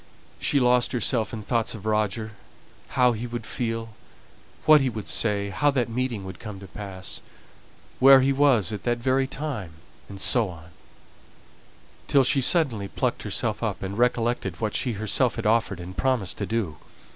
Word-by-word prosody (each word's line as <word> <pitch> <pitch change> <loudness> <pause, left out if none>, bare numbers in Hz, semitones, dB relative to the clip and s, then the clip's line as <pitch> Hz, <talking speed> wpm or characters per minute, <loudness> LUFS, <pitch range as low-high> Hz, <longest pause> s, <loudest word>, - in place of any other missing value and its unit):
She 140 - +2
lost 125 0 +3
herself 120 -2 +1
in 110 -3 -6
thoughts 115 +1 0
of 105 -2 -10
Roger 110 0 -1 0.7
how 125 -1 +5
he 120 +1 -4
would 120 -2 -6
feel, 115 -2 -3 0.8
what 155 -1 +7
he 135 - +1
would 110 -3 -6
say, 100 -2 0
how 145 +9 +2
that 130 -4 0
meeting 115 -4 -2
would 95 - -8
come 105 -4 -8
to 100 - -10
pass, 95 0 -7 0.8
where 135 0 +8
he 135 +1 +2
was 130 -8 +3
at 105 - -5
that 120 -1 0
very 130 +2 +1
time, 130 - -5 0.4
and 100 -1 -9
so 115 0 +3
on, 80 -1 -12 1.4
till 140 -2 +4
she 135 +2 +3
suddenly 125 - +2
plucked - - -2
herself - - -1
up, - - -3
and 95 +1 -4
recollected 120 -6 0
what 110 -1 -2
she 125 - -1
herself 110 +4 +1
had 115 -3 -5
offered 110 -4 +1
and 90 +1 -8
promised 130 -8 0
to 100 - -2
do. 105 -9 -2
115 Hz, 170 wpm, -25 LUFS, 100-130 Hz, 1.4 s, where